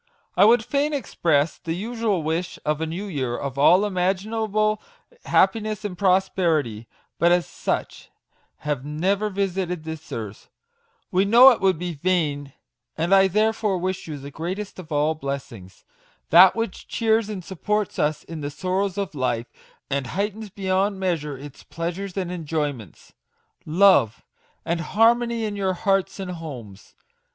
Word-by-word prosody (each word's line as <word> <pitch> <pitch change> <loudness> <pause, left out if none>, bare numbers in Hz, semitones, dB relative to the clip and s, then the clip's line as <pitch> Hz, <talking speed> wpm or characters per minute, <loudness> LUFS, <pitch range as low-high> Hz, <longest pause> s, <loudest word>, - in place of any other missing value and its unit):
I 190 - +6
would 225 0 +5
fain 290 +2 0
express 160 - 0
tlje 165 -1 -4
usual 220 -4 -1
wish 165 +3 -2
of 150 +1 0
a 160 - -1
new 175 +6 -4
year 130 -10 -3
of 140 -1 -5
all 180 +8 +6
imaginable 215 +3 0 0.4
happiness 215 -1 +1
and 195 -3 -4
prosperity, 175 - +1 0.3
but 170 +1 +4
as 175 0 +3
such - - -4 0.5
have 150 -4 -2
never 190 +8 0
visited 185 -4 -2
this 160 -1 -8
earth, 110 -3 -7 0.6
we 185 +1 +3
know 240 +6 +8
it 235 - -1
would 190 -3 +3
be 175 +1 -4
vain; 150 -4 -1 0.5
and 170 +4 +1
I 195 0 +6
therefore 215 0 +1
wish 185 0 -3
you 150 -2 -5
the 140 +1 -9
greatest 185 +7 -5
of 170 -3 -11
all 150 +1 +2
blessings 135 - -7 0.5
that 180 +3 +8
which 225 -4 -4
cheers 220 -1 +1
and 190 -5 -6
supports 210 +2 -2
us 150 +1 0
in 165 -2 -8
the 145 - -3
sorrows 185 +6 -2
of 200 -5 -3
life, 125 -4 -2 0.4
and 140 -2 -2
heightens 210 - -3
beyond 195 +1 -1
measure 160 -7 -2
its 140 0 -11
pleasures 175 +3 -5
and 180 -2 -2
enjoyments, 150 - -4 0.5
love 170 - +4 0.4
and 170 0 -1
harmony 230 +5 +2
in 210 -1 -3
your 190 -2 0
hearts 195 +1 0
and 190 -2 -4
homes 125 - -9
180 Hz, 150 wpm, -23 LUFS, 150-200 Hz, 0.6 s, know